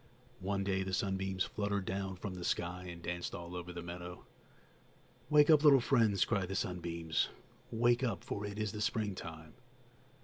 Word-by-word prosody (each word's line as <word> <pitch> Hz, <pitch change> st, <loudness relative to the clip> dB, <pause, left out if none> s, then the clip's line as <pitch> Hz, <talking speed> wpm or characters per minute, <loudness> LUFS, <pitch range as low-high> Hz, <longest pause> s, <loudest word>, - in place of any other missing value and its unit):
One 100 Hz, +1 st, -1 dB
day 95 Hz, -1 st, +1 dB
the 95 Hz, -1 st, -1 dB
sunbeams 95 Hz, -1 st, 0 dB
fluttered 100 Hz, -2 st, -1 dB
down 95 Hz, 0 st, -2 dB
from 95 Hz, +1 st, -5 dB
the 90 Hz, -1 st, -6 dB
sky 90 Hz, +1 st, -1 dB
and 85 Hz, -1 st, -9 dB
danced 90 Hz, +1 st, -3 dB
all 85 Hz, +1 st, -7 dB
over 90 Hz, 0 st, -5 dB
the 85 Hz, -1 st, -6 dB
meadow. 90 Hz, 0 st, -7 dB, 1.0 s
"Wake 150 Hz, +1 st, +7 dB
up, 150 Hz, -1 st, +6 dB
little 140 Hz, -3 st, +8 dB
friends!" 115 Hz, -6 st, +3 dB
cried 100 Hz, -5 st, 0 dB
the 95 Hz, -, -2 dB
sunbeams, 85 Hz, -4 st, -1 dB, 0.4 s
"wake 120 Hz, +2 st, +3 dB
up, 115 Hz, -, -1 dB
for 100 Hz, -, -4 dB
it 100 Hz, 0 st, -5 dB
is 110 Hz, -1 st, -1 dB
the 105 Hz, -1 st, -5 dB
springtime!" 85 Hz, -8 st, -3 dB
95 Hz, 170 wpm, -34 LUFS, 90-105 Hz, 1.0 s, little